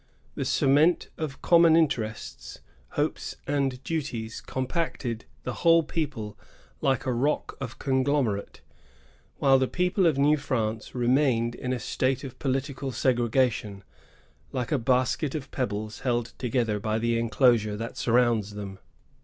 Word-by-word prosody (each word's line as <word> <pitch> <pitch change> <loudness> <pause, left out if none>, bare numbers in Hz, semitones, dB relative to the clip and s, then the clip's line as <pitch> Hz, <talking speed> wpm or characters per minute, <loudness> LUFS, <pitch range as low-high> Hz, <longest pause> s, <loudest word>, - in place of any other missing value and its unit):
The 135 - -3
cement 145 +5 +3
of 150 -4 -5
common 170 -2 +6
interests, 125 -10 -1 0.3
hopes, - - -2
and 135 -2 -1
duties 125 -9 -3
compacted 130 -4 -3 0.2
the 125 - -3
whole 165 -1 +6
people 115 -10 -4 0.4
like 135 -3 +1
a 130 - 0
rock 140 +6 0
of 125 -3 -5
conglomerate; 130 -6 0 0.8
while 135 -1 +5
the 130 - +2
people 180 +2 +1
of 155 -4 +2
New 145 +2 +4
France 115 -6 -2
remained 120 -1 +2
in 125 +1 -4
a 130 - 0
state 130 +2 -1
of 130 -2 -8
political 135 0 -2
segre 120 -1 +1
gation, 110 -5 0 0.7
like 125 -2 -3
a 145 - +2
basket 130 +4 +1
of 140 -3 -5
pebbles 105 -4 -3
held 120 -2 -1
together 115 -4 0
by 110 +1 -1
the 115 +1 +1
enclosure 115 -3 +3
that 115 +2 -5
surrounds 115 -4 +2
them. 100 -2 -7
130 Hz, 135 wpm, -27 LUFS, 115-140 Hz, 0.8 s, common